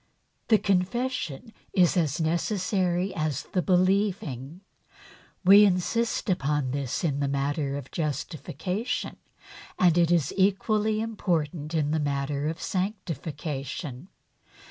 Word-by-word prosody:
The 220 - +6
confession 210 - -1 0.2
is 180 -1 +4
as 160 -3 +1
necessary 180 +2 0
as 155 -3 -2
the 180 - -1
believing. 185 - 0 0.8
We 200 +3 +9
insist 205 +4 +1
upon 145 -7 0
this 140 +1 -2
in 145 -4 0
the 140 - 0
matter 140 +1 -1
of 135 -2 -9
justification 165 - -3 0.6
and 175 -3 +4
it 170 -1 +4
is 170 -5 +2
equally 215 +2 +2
important 170 -8 -2
in 150 -2 +1
the 160 - +1
matter 140 0 -1
of 160 +2 -3
sanctification. 160 - -4
170 Hz, 110 wpm, -27 LUFS, 145-195 Hz, 0.8 s, We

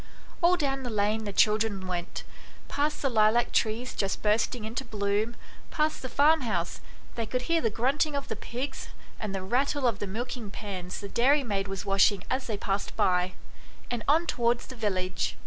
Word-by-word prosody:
All 355 +1 +5
down 275 -4 0
the 250 - -4
lane 215 0 0
the 205 - -3
children 210 -2 +2
went 175 -1 -4 0.4
past 295 +1 -1
the - - +3
lilac 225 -1 +3
trees 230 +3 0
just 195 -1 -2
bursting 215 +2 +1
into 230 +4 -3
bloom, 210 0 -1 0.3
past 305 0 0
the 255 - -5
farm 305 +5 +4
house, 175 -8 -2 0.3
they 230 -2 -3
could 250 +2 -1
hear 330 +4 +2
the 225 - +2
grunting 275 +7 +1
of 280 - -3
the - - -3
pigs, 265 +3 -5 0.3
and 205 -2 -3
the 190 - -3
rattle 265 +7 +1
of 230 -5 +2
the 205 - -3
milking 235 +2 -4
pans 185 -3 -6
the 200 - -5
dairy 270 +8 +3
maid 200 -4 -1
was 195 +1 -4
washing 195 0 +4
as 260 0 0
they 215 -3 -2
passed 200 0 -2
by, 180 0 +2 0.6
and 240 -2 -1
on 315 +4 +4
towards 240 -5 +1
the 260 - -9
village. 185 -5 -1
225 Hz, 185 wpm, -28 LUFS, 200-260 Hz, 0.6 s, All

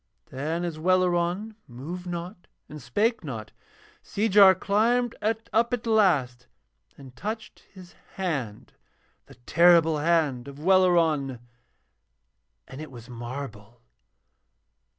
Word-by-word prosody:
Then 160 +6 -3
as 165 -3 -5
Welleran 185 +4 0
moved 160 +9 -8
not 175 +1 -7 0.2
and 150 0 -10
spake 210 - 0
not, 115 -8 -7 0.5
Seejar 200 -2 +5
climbed 230 +6 +1
up 225 +1 0
at 240 -1 -2
last 150 - +1 0.5
and 135 -3 -14
touched 215 - -6
his 185 -2 -14 0.2
hand, 140 - -4 0.5
the - - -16
terrible 165 +3 +4
hand 150 -6 +1
of 140 0 -10
Welleran, 165 -6 +2 1.3
and 130 +3 -9
it 155 - -8
was 120 -1 -12
marble. 120 -2 -8
170 Hz, 105 wpm, -26 LUFS, 135-195 Hz, 1.3 s, Seejar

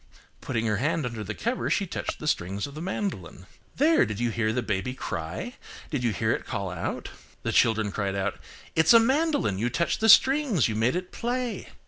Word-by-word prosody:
Putting 115 -3 -2
her 105 -2 +1
hand 150 +4 0
under 115 -3 -4
the 105 +1 -5
cover, 240 +2 -2
she 200 - +1
touched - - -4
the 155 - -6
strings 100 -6 -1
of 140 - -9
the 155 - -7
mandolin. 175 - -4 0.3
"There! 315 +4 +4
did 110 -3 -3
you 120 -1 0
hear 110 0 0
the 125 +2 -1
baby 110 +4 -2
cry? 85 - -5 0.3
Did 140 -5 -1
you 120 - +2
hear 110 +3 0
it - - -1
call 100 -2 -4
out?" 85 -1 -4 0.3
The - - -1
children 110 -3 +3
cried 100 -1 -2
out–"It's 100 - 0
a 230 - +9
mandolin, 275 - +1
you 120 +3 +1
touched 170 +7 0
the 225 - +3
strings, 260 - +5
you 110 - -2
made 115 +6 +1
it 180 0 -4
play." 245 0 -3
120 Hz, 200 wpm, -26 LUFS, -, 0.3 s, a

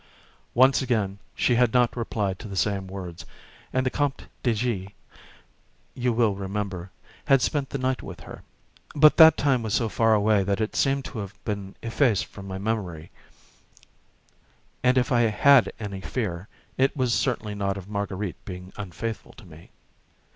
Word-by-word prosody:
Once 130 +3 +5
already 110 -7 -1 0.2
she 125 - +2
had 120 -1 +3
not 125 -1 +3
replied 105 -5 -2
to - - -8
the 100 - -7
same 100 0 0
words, 90 -3 -7 0.5
and 130 0 0
the 130 - +1
Comte 145 -2 -1 0.2
de 120 - +2
G., 105 -4 -3 1.0
you 125 -1 0
will 115 -3 +2
remember, 95 -2 -4 0.4
had 135 -1 +5
spent 140 +1 -1
the - - -3
night 130 0 -1
with 90 -3 -9
her; - - -10 0.5
but 150 0 +6
that 160 -1 +9
time 135 -4 +2
was 110 -2 -1
so 115 -2 +1
far 115 0 +3
away 105 0 +3
that 100 +1 -1
it 110 0 -2
seemed 135 -1 +1
to 115 - -6
have 100 0 -6
been 100 -2 -4
effaced 115 -2 +1
from 100 -1 -11
my 95 0 -5
memory, 95 -6 -3 1.7
and 125 +1 +3
if 130 +3 +1
I 120 -1 +4
had 120 +3 +5
any 100 -3 -5
fear, 95 -5 -4 0.3
it 135 +2 +2
was 125 -3 +1
certainly 115 -5 -1
not 100 -1 -2
of 95 -1 -9
Marguerite 100 -2 -4
being 90 0 -9
unfaithful 105 +3 -6
to - - -15
me. 80 -1 -15
110 Hz, 170 wpm, -25 LUFS, 95-125 Hz, 1.7 s, that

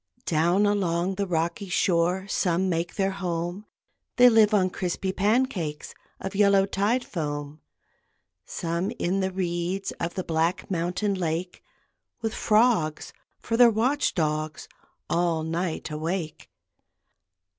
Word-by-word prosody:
Down 175 +5 +2
along 185 -3 +1
the 200 +1 -2
rocky 170 +3 -2
shore 180 +2 +1
Some 185 -1 +1
make 170 0 -2
their 195 0 +1
home, 180 +1 -4 0.5
They 250 0 +8
live 220 -2 +5
on 190 -3 +2
crispy 185 +1 -2
pancakes 200 - 0 0.3
Of 190 - -5
yellow 200 -1 +4
tide 205 +6 0
foam; 145 -2 -5 0.8
Some 170 - -3
in 185 +3 0
the 190 -1 0
reeds 180 +1 -2
Of 170 +1 -3
the 185 - -2
black 165 +3 -1
mountain 180 +4 -1
lake, 180 0 -3 0.6
With 225 -2 -3
frogs 215 -9 +2 0.3
for 230 - -2
their 245 -1 +8
watch 250 +7 +1
dogs, 155 -1 -2 0.4
All 170 -2 0
night 165 0 -3
awake. 160 +2 -4
180 Hz, 125 wpm, -26 LUFS, 165-200 Hz, 0.8 s, They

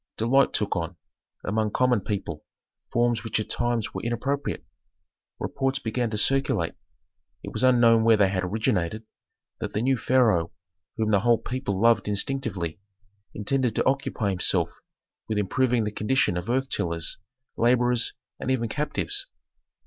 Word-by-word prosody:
Delight 130 +5 +3
took 105 -2 0
on, 85 0 -3 0.5
among 110 +1 0
common 125 0 +2
people, 100 0 -4 0.5
forms 120 -1 +1
which 115 -1 -1
at 110 - -4
times 120 -2 -1
were - - -4
inappropriate. 135 +5 -2 0.7
Reports 135 0 -1
began 115 +1 -2
to 105 - -3
circulate, 135 +5 +1 0.7
it - - -7
was 110 - -1
unknown 120 -3 +5
where 115 -1 +5
they 100 -2 +4
had 95 -1 -1
originated, 105 0 -1 0.6
that - - -4
the 105 - 0
new 130 -1 +2
pharaoh, 110 -11 +3 0.5
whom 110 -1 0
the 100 - +4
whole 120 +3 +4
people 120 -7 -3
loved 115 0 +4
instinctively, 100 - -2 0.6
intended 125 +2 0
to - - +1
occupy 130 -6 0
himself 90 - +1 0.6
with 110 - -1
improving 120 +4 +1
the 105 - -2
condition 105 -2 +1
of 90 +5 -4
earth 130 +2 +1
tillers, 85 -1 -2 0.4
laborers, 120 0 +2 0.3
and - - -4
even 125 -3 +1
captives. 145 - 0
115 Hz, 145 wpm, -26 LUFS, 105-125 Hz, 0.7 s, unknown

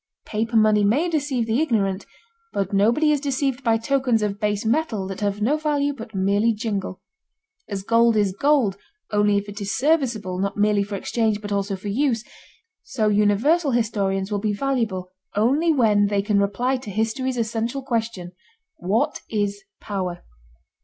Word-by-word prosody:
Paper 225 +2 -1
money 215 -1 +4
may 260 +12 +2
deceive 285 -7 -1
the 225 +5 +1
ignorant, 205 -9 0 0.5
but 200 0 -2
nobody 235 +10 +3
is 295 -2 +1
deceived 275 -2 -1
by 225 -2 +3
tokens 245 -1 +1
of 205 -1 -2
base 210 0 -1
metal 225 -5 0
that 190 0 -6
have 205 0 -1
no 285 +7 +2
value 290 -2 0
but 225 -4 -10
merely 200 +4 +2
jingle. 200 -4 -4 0.7
As 195 -2 -4
gold 230 +2 +3
is 205 -2 +2
gold 265 -6 +2 0.3
only 205 -1 +3
if 200 0 -3
it 205 +1 -8
is 200 0 -2
serviceable 245 - 0
not 200 +1 -2
merely 210 0 +3
for 200 0 -4
exchange 220 +1 0
but 205 -1 -7
also 200 0 -1
for 200 +2 -6
use, 235 0 0 0.6
so 215 -4 -1
universal 225 - +2
historians 200 -4 0
will 205 - 0
be 210 0 -1
valuable 215 -7 -2 0.2
only 275 +11 +3
when 215 -8 +3
they 200 -1 0
can 205 -1 +2
reply 240 +7 0
to 250 -4 -9
history's 230 +5 -1
essential 230 +4 -2
question: 225 -8 -3 0.5
what 195 +6 0
is 205 -2 -1 0.2
power? 185 -4 -4
215 Hz, 165 wpm, -23 LUFS, 200-255 Hz, 0.7 s, money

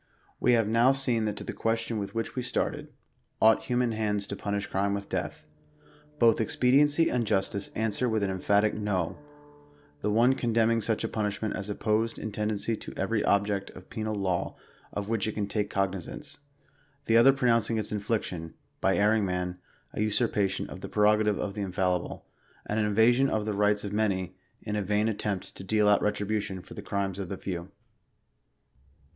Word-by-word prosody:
We 125 - +4
have 115 -3 +3
now 115 +4 +4
seen 125 -5 0
that 105 -1 -2
to - - -5
the - - -5
question 115 0 -1
with 100 +2 -5
which 115 - -3
we 130 - -1
started 125 - -2 0.3
— - - -44
ought 110 0 +5
human 125 -1 +1
hands 105 -2 -1
to 100 - -5
punish 100 0 -2
crime 100 +1 0
with 100 0 -6
death? 75 -4 -4 0.4
— 150 0 -28
^hoth 115 -1 +5
ex 110 - -1
pediency 145 +5 +4
and 120 -3 0
justice 100 0 0
answer 110 +3 0
with 110 -2 0
an 95 - 0
emphatic 100 +3 +2
no: 100 -5 -2 0.8
the - - 0
one 120 +5 +4
con 120 -4 -2
demning 115 0 +3
such 110 +1 0
a - - 0
punishment 105 -1 -2
as 100 0 -5
opposed 110 +2 0
in 110 - -5
tendency 105 +1 -1
to - - -9
every 105 +3 0
object 100 -1 +1
of 95 - -14
penal 110 -1 -3
law 95 -3 -1 0.4
of 100 -1 -4
which 110 -2 0
it 110 - -2
can 105 - -1
take 105 0 -2
cognisance; 95 - -3 0.7
the 115 - +2
other 120 +4 +8
pronouncing 115 -4 +2
its 110 -1 -2
infliction, 100 -6 -3 0.2
by 95 - +2
erring 105 +1 +3
man, 90 -1 -2 0.3
a - - -2
usurpation 105 -2 +1
of - - -9
the - - -6
prerogative 105 0 +3
of 100 - -3
the 105 - -4
Infallible, 90 -2 -1 0.4
and 105 - -1
an 105 - +2
invasion 120 +6 +4
of 110 -3 -1
the 105 - -1
rights 105 0 +2
of 100 - -4
the 105 - -2
many, 95 -4 0 0.3
in 105 -1 -3
a 105 - 0
vain 105 +2 +1
attempt 105 -3 -3
to - - -8
deal 105 +2 +2
out 105 0 +5
retribution 105 -1 -1
for - - -12
the - - -7
crimes 100 -1 -2
of 95 -3 -4
the 100 - -4
few. 90 -1 -5
105 Hz, 195 wpm, -28 LUFS, 100-115 Hz, 0.8 s, other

